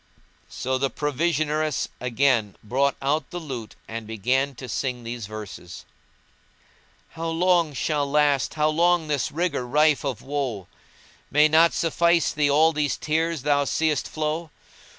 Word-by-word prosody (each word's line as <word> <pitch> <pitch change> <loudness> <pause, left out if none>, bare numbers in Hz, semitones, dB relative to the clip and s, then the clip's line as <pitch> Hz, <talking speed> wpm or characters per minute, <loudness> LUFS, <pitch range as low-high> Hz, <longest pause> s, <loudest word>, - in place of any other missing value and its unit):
So 130 +2 -2
the 135 0 +1
provisioneress 155 +1 -1
again 120 -4 +1
brought 135 +6 +1
out 150 +3 0
the 175 - -6
lute 130 -10 -7
and 115 -1 -6
began 130 +6 0
to 130 - -8
sing 125 0 -3
these 115 -2 -6
verses:— 105 -5 -9 1.2
"How 165 0 -5
long 170 -2 +2
shall 140 +4 -1
last, 145 -1 +2
how 155 0 +2
long 170 0 +2
this 140 -3 0
rigour 170 -4 -1
rife 150 +2 +3
of 130 -5 -3
woe 135 -9 -3 0.3
* - - -28
May 150 +2 +5
not 160 +2 +5
suffice 170 0 +2
thee 150 -1 +2
all 155 +3 +4
these 150 -1 0
tears 160 -1 -1
thou 145 -1 +2
seest 155 +1 0
flow? 155 +1 -3
145 Hz, 145 wpm, -24 LUFS, 130-155 Hz, 1.2 s, May